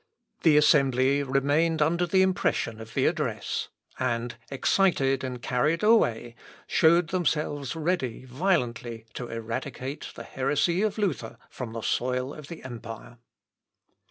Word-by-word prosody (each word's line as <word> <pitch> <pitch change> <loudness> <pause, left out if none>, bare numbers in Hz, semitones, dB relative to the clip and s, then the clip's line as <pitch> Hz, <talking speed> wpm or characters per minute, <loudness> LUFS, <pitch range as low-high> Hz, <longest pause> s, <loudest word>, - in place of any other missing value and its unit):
The 155 -3 +5
assembly 140 -2 +4
remained 145 +4 +1
under 170 +4 +2
the 190 +2 +4
impression 185 -11 0
of 110 0 -11
the - - +2
address, - - -1 0.3
and, 120 -1 -1 0.2
excited 135 -3 +2
and 125 -1 -5
carried 150 +8 +1
away, 120 - +3 0.3
showed 170 +1 +4
themselves 150 -5 -1
ready 155 -7 -2
violently 125 -6 -1
to 125 - -5
eradicate 120 +5 -5
the - - -7
heresy 150 +7 0
of 215 -1 0
Luther 200 -8 -2
from 120 -3 -6
the 115 - -4
soil 125 +2 -1
of 150 -2 -10
the 170 - -9
empire. 120 -1 -9
135 Hz, 130 wpm, -27 LUFS, 125-165 Hz, 0.3 s, The